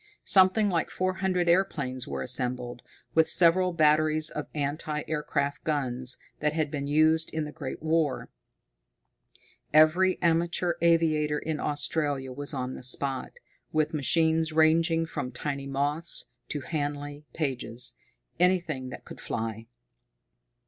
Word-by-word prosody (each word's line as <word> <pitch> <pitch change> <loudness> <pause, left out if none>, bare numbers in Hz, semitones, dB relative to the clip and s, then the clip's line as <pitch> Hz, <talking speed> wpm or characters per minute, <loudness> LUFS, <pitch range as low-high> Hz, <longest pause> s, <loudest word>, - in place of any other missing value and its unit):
Something 190 +3 +4
like 175 -4 0
four 185 0 -1
hundred 185 -2 0
airplanes 140 -8 0
were - - -4
assembled, 125 -1 -2 0.3
with 160 0 +4
several 180 +2 +5
batteries 155 -1 +3
of 150 - -5
anti 150 +1 -2
aircraft 145 -2 -2
guns 130 -4 -1 0.2
that 150 0 0
had 155 -2 -1
been 140 -2 -3
used 155 +2 +3
in 160 -1 -2
the 150 - -7
Great 130 +1 -7
War. 160 -4 0 1.4
Every 165 +5 +4
amateur 170 +1 +1
aviator 155 -3 +2
in 155 0 -3
Australia 145 -2 -1
was 145 +2 -5
on 130 -3 -3
the - - -8
spot, 130 +1 0 0.4
with 155 0 0
machines 160 +2 +2
ranging 165 +1 +3
from 125 -5 -5
tiny 140 +2 -4
Moths 145 +4 -1 0.2
to 145 - -3
Handley 145 0 -4
Pages 125 -5 0 0.5
anything 170 -8 +1
that - - -10
could - - -11
fly. 115 0 -4
150 Hz, 130 wpm, -27 LUFS, 140-165 Hz, 1.4 s, several